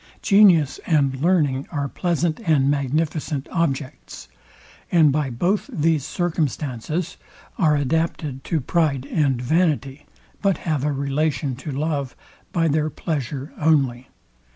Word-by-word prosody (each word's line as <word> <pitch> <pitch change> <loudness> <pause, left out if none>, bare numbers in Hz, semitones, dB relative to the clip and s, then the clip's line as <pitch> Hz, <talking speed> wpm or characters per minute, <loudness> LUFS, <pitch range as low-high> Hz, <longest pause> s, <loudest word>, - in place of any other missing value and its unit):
Genius 185 -9 +5
and 140 -5 +2
learning 150 -6 +2
are 145 -4 -2
pleasant 170 +1 -1
and 150 -9 +2
magnificent 145 +1 -1
objects, 140 - -3 0.6
and 160 -4 +5
by 145 -1 0
both 175 - -1
these 155 -2 +1
circumstances 155 -2 -2 0.4
are 155 -4 +4
adapted 145 -1 -1
to 165 - -1
pride 140 -2 0
and 140 -6 +1
vanity; 150 0 0 0.3
but 195 -2 +2
have 155 -5 0
a 150 - +1
relation 140 0 -1
to 130 +5 -8
love 140 -2 -2 0.4
by 165 -1 +1
their 155 0 +1
pleasure 140 -3 -4
only. 135 -5 +2
150 Hz, 120 wpm, -22 LUFS, 135-165 Hz, 0.6 s, Genius